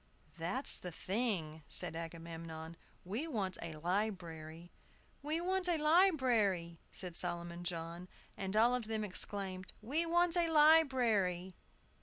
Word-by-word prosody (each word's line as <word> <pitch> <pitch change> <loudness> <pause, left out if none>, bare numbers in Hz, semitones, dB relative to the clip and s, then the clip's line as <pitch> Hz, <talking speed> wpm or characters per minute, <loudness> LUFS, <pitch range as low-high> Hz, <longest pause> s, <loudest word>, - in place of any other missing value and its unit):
"That's 175 +12 +2
the 180 - -7
thing!" 180 -5 -2
said 170 -3 +1
Agamemnon. 165 0 -7 0.3
"We 220 - -3
want 200 - -1
a 165 -1 -6
library." 170 -2 -4 0.5
"We 305 +3 -1
want 370 +1 +1
a 340 - +2
library!" 255 - +2
said 180 -3 -2
Solomon 175 0 0
John. 170 0 -5 0.3
And 195 +1 -4
all 235 +3 +5
of 245 -3 -2
them 220 -1 -2
exclaimed, 190 -1 -2
"We 295 +10 0
want 345 +1 +3
a 340 -1 +2
library!" 250 - +3
190 Hz, 125 wpm, -35 LUFS, 170-260 Hz, 0.5 s, all